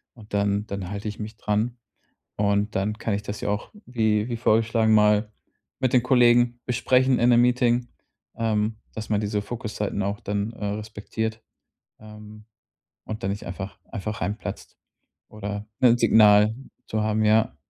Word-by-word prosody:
und 110 -4 -16
dann 100 +1 0
dann 100 -3 -5
halte 100 +1 -5
ich 105 - -9
mich 110 0 -7
dran. 110 +4 -1 0.6
Und 100 +1 +1
dann 100 +2 0
kann 110 - -1
ich 100 - -3
das 105 0 -6
ja - - -1
auch, 105 +1 -3 0.2
wie 110 -3 +1
wie 120 - -2
vorgeschlagen, 115 0 +2
mal 105 0 +4 0.5
mit 130 -2 +1
den 125 -3 +4
Kollegen 120 -1 +4
besprechen 125 +1 +2
in 120 - +3
'nem 120 -1 +6
Meeting, 120 0 +2 0.5
ähm, 110 -1 0 0.2
dass 110 -1 -7
man 105 -1 +2
diese 105 0 -1
Fokuszeiten 105 -3 -4
auch 100 +1 -2
dann, 105 +1 -2
äh, 105 - -7
respektiert, 110 +1 -4 0.6
ähm, 105 0 -13 0.6
und 110 0 -6
dann 95 - 0
nicht 100 - -6
einfach 95 +2 -7
einfach 105 0 -4
reinplatzt 105 +4 -5 0.5
oder 105 0 -6
'nen 120 -1 +6
Signal 105 -1 +6 0.3
zu 110 0 -1
haben, 110 0 +1
ja. 110 +1 +3
110 Hz, 160 wpm, -24 LUFS, 105-115 Hz, 0.6 s, nem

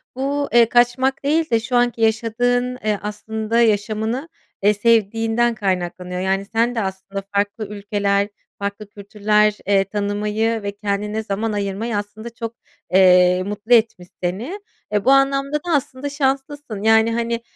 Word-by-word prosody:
Bu, 280 +2 -1
eee, 235 -1 +6
kaçmak 245 +3 +2
değil 310 +3 +1
de 230 - +4
şu 235 +2 -3
anki 240 -1 +1
yaşadığın, 245 +3 +1
eee, 210 -2 +1
aslında, 220 +2 -2
yaşamını, 220 +5 0 0.3
eee, 205 +1 +5
sevdiğinden 225 +2 +2
kaynaklanıyor. 180 -2 -2
Yani, 195 +1 0
sen 230 +3 0
de 225 - 0
aslında 195 0 -5
farklı 205 +1 -1
ülkeler, 200 -1 -1 0.3
farklı 200 +1 -5
kültürler, 210 +1 +1
eee, 200 -1 +4
tanımayı 210 +2 -1
ve 200 - -2
kendine 210 +1 -3
zaman 215 +2 -2
ayırmayı 205 +2 -2
aslında 215 +3 -6
çok, 230 0 -7 0.4
eee, 180 -1 +5
mutlu 210 +4 -1
etmiş 220 -6 +2 0.2
seni. 225 - -3 0.3
Eee, 205 -1 0
bu 265 - +5
anlamda 275 +1 +3
da 340 +3 -3
aslında 275 0 -2
şanslısın, 275 -5 -2
yani, 220 +1 +4
hani, 235 0 -1
220 Hz, 145 wpm, -20 LUFS, 200-240 Hz, 0.4 s, eee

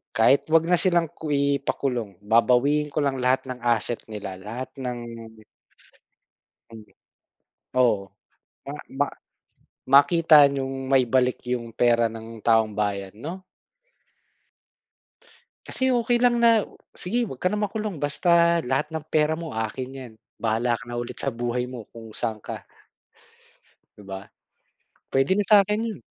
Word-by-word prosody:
Kahit 115 +5 +4
huwag 160 0 +4
na 175 +1 +2
silang 170 -4 +1
ku 160 - -8
ipakulong, 140 -6 -1
babawiin 125 +7 +3
ko 145 +1 -2
lang 135 -2 -1
lahat 125 +1 +2
ng 125 - -7
asset 120 -1 0
nila, 100 -4 -7
lahat 115 +7 -7
ng 125 -2 -4 1.7
Hmm, 115 -1 -11 1.0
oo, 110 -6 +2 0.6
ma 140 - -5 0.3
ma 145 - +3 0.8
makita 150 +1 +6
niyong 135 -1 -4
maibalik 130 -1 +3 0.2
yung 120 -2 -6
pera 115 0 +2
ng 115 0 -10
taong 110 -2 +3
bayan, 100 -2 -2
'no? 165 - -7 2.2
Kasi, 260 0 -1
okey 240 -1 +1
lang 245 -1 +4
na, 230 -2 +5 0.3
"Sige, 235 +7 -2
huwag 135 - -9
ka 180 - +2
na 210 - -2
makulong, 210 -2 -3
basta 170 +3 +3
lahat 135 +4 -2
ng 160 - -3
pera 155 0 +2
mo, 165 0 -5
akin 125 +4 -4
yan. 125 -4 -9 0.2
Bahala 115 +1 0
ka 125 - -12
na 120 - -8
ulit 120 0 -7
sa 135 - -2
buhay 120 +1 -2
mo, 125 -4 -9
kung 115 -2 -12
saan 115 -2 -3
ka" 105 - -7 1.4
'Di 105 - -13
ba, 95 -1 -5 0.9
puwede 135 +6 +2
na 205 +1 +1
sa'kin 210 0 +5
'yon. 220 - -5
130 Hz, 140 wpm, -24 LUFS, 115-165 Hz, 2.2 s, makita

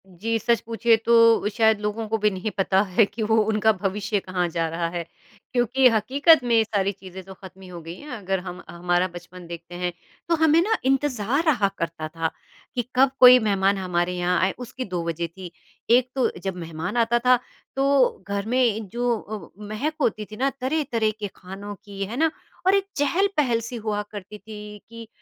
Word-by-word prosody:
जी, 210 +5 -2
सच 235 +2 +1
पूछिए 230 0 +3
तो 230 -2 +5
शायद 220 0 +3
लोगों 210 +1 -3
को 225 - +1
भी 210 0 +2
नहीं 190 +3 -4
पता 190 0 +3 0.2
है 225 - +7
कि 210 +3 -5
वो 220 +1 +2
उनका 220 0 +3
भविष्य 205 +1 -1
कहाँ 185 -2 -2
जा 165 0 -1
रहा 165 +1 -2
है 170 0 -4 0.5
क्योंकि 250 +2 +4
हकीकत 270 +8 +4
में 240 -1 +2
ये 225 - +5
सारी 200 -3 0
चीज़ें 190 -1 -11
तो 190 +1 -11
ख़त्म 190 0 -13
हो 175 -1 -8
गई 165 +1 -8
हैं। 300 - -11
अगर 195 -5 -2
हम 180 0 -8
हमारा 175 +1 0
बचपन 175 0 -11
देखते 170 +1 -9
हैं 180 0 -2 0.4
तो 335 - +4
हमें 320 0 +4
ना 445 +5 +1
इंतज़ार 270 0 +1
रहा 245 -11 +3
करता 165 -2 -4
था 165 0 -3 0.4
कि 245 - +1
कब 265 +1 +5
कोई 250 0 +10
मेहमान 200 -3 +1
हमारे 180 -1 -1
यहाँ 180 +1 +1
आए, 185 - +2
उसकी 255 +1 -6
2 180 -3 -3
वज़ह 170 0 -2
थी। 180 +1 -10 0.4
एक 250 +1 +4
तो 260 - +2
जब 190 -1 -3
मेहमान 165 +4 -5
आता 235 0 +3
था 250 +1 +4 0.4
तो 270 -5 +2
घर 200 0 -2
में 225 -3 +1
जो 240 +4 -2 0.5
व 210 - -9
महक 240 +9 -2
होती 215 -4 0
थी - - -7
ना 270 +3 +1
तरह-तरह 255 -6 0
के 205 - -3
खानों 195 +3 -8
की, 200 -1 -6
है 225 +5 -6
ना? 320 +2 +2 0.3
और 380 +1 +5
एक 395 -1 +1
चहल-पहल 295 -5 +1
सी 230 +2 -7
हुआ 215 -2 -2
करती 205 0 -8
थी 210 -1 -10
कि 230 -1 -10
210 Hz, 195 wpm, -24 LUFS, 185-245 Hz, 0.5 s, कोई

